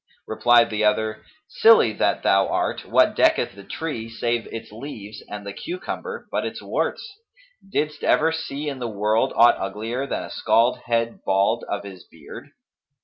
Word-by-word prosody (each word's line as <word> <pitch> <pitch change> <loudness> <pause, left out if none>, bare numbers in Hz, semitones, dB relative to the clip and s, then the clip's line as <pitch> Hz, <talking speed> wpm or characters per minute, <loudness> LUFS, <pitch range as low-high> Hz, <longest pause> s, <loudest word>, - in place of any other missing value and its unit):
Replied 120 +1 +4
the 110 0 -1
other, 110 +1 0 0.2
'Silly 220 - +5
that - - 0
thou 95 0 +4
art, - - -2
what - - +3
decketh - - +2
the 100 0 -12
tree 115 -4 -5
save 115 0 -2
its 115 - -8
leaves 110 -3 -9
and 105 0 -7
the 100 - -6
cucumber 470 - -6
but - - -1
its - - -5
warts?[FN#256] 460 - -6
Didst 150 -3 -2
ever 160 +1 +3
see 155 -2 -4
in 140 -2 -4
the 120 - -3
world 105 +1 +1
aught 120 +1 +6
uglier 110 +7 -3
than - - -3
a - - -9
scald 115 +2 +2
head 115 0 -1
bald 100 +5 +1
of 100 - -3
his 95 -3 -10
beard? 80 -3 -12
115 Hz, 165 wpm, -23 LUFS, 105-145 Hz, 0.2 s, aught